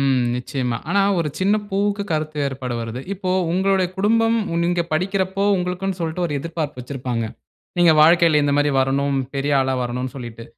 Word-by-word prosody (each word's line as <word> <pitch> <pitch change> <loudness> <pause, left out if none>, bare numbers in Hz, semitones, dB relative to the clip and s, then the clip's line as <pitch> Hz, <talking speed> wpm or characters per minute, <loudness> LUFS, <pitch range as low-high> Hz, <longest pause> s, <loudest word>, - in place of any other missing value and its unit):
ம் 135 -2 +2 0.2
நிச்சயமா. 125 -2 -2
ஆனா 200 +3 +2 0.2
ஒரு 160 -3 0
சின்ன 195 +3 +3 0.2
பூவுக்கு 200 +1 0
கருத்து 155 0 -2
வேறுபாடு 130 -3 -3
வருது. 115 +2 -5
இப்போ 185 -1 -3 0.2
உங்களோடைய 190 0 +2
குடும்பம் 225 +3 +2 0.3
நீங்க 175 0 +1
படிக்கிறப்போ, 190 +3 0
உங்களுக்குனு 180 +1 -2
சொல்லிட்டு 165 +2 -2
ஒரு 150 - -5
எதிர்ப்பார்ப்பு 155 -4 -4
வைச்சிருப்பாங்க. 125 -3 -3 0.5
நீங்க 170 -2 +6
வாழ்க்கையில 165 -2 +5
இந்த 145 0 +1
மாரி 145 0 +3
வரணும், 140 +1 +1 0.2
பெரிய 140 +1 -1
ஆளா 130 0 0
வரணும் 125 +1 -3
சொல்லிட்டு. 120 -3 -8
155 Hz, 160 wpm, -21 LUFS, 130-185 Hz, 0.5 s, நீங்க